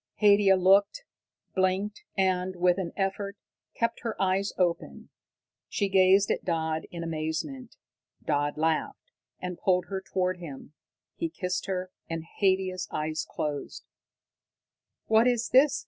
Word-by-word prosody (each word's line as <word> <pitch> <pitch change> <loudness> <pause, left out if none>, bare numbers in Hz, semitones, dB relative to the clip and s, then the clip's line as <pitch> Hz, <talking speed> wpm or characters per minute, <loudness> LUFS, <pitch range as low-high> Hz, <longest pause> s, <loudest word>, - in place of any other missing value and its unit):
Haidia 200 -2 +6
looked, 195 - +4 0.5
blinked 190 +2 0 0.2
and, 185 -1 +1
with 180 +1 +2
an 175 -3 -3
effort 200 +1 -2 0.4
kept 230 - 0
her 230 -2 -4
eyes 195 +1 +1
open. 175 -2 -1 0.6
She 200 -2 0
gazed 190 +1 +5
at - - -1
Dodd 160 -2 -1
in 170 -1 -6
amazement. 165 - -4 0.5
Dodd 145 -1 0
laughed, 160 - -1 0.3
and 180 -1 -5
pulled 180 -1 +1
her 190 -1 -3
toward 185 -1 -1
him. 150 -4 -9 0.4
He 335 - -1
kissed 180 - -3
her, 185 -1 -3 0.2
and 165 -1 -3 0.2
Haidia's 190 -2 +1
eyes 155 +1 -3
closed. 145 -2 -4 1.2
"What 225 +2 +4
is 240 -1 +1
this?" 265 +1 +5
185 Hz, 130 wpm, -28 LUFS, 170-200 Hz, 1.2 s, Haidia